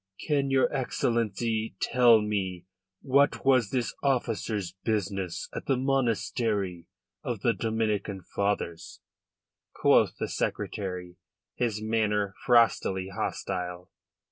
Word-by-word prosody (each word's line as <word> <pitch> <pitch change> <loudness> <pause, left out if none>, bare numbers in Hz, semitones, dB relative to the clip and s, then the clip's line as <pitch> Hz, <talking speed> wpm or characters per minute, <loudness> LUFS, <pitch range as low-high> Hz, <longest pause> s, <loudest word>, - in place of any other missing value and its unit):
"Can 140 -3 +1
your 135 -1 +2
Excellency 115 -3 -1
tell 120 -3 +5
me 95 -4 -2 0.4
what 140 +2 +2
was 130 -6 +4
this 125 -2 -1
officer's 115 -8 -1
business 100 -5 -2
at - - -6
the 135 - +2
monastery 115 -8 0 0.4
of - - -3
the - - +3
Dominican 105 -4 -2
fathers?" 100 -4 -3 0.8
quoth - - +4
the - - -2
Secretary, 90 -3 -3 0.4
his 110 -3 -2
manner 105 -3 0
frostily 110 -6 +3
hostile. 90 -1 -4
110 Hz, 100 wpm, -28 LUFS, 95-120 Hz, 0.8 s, tell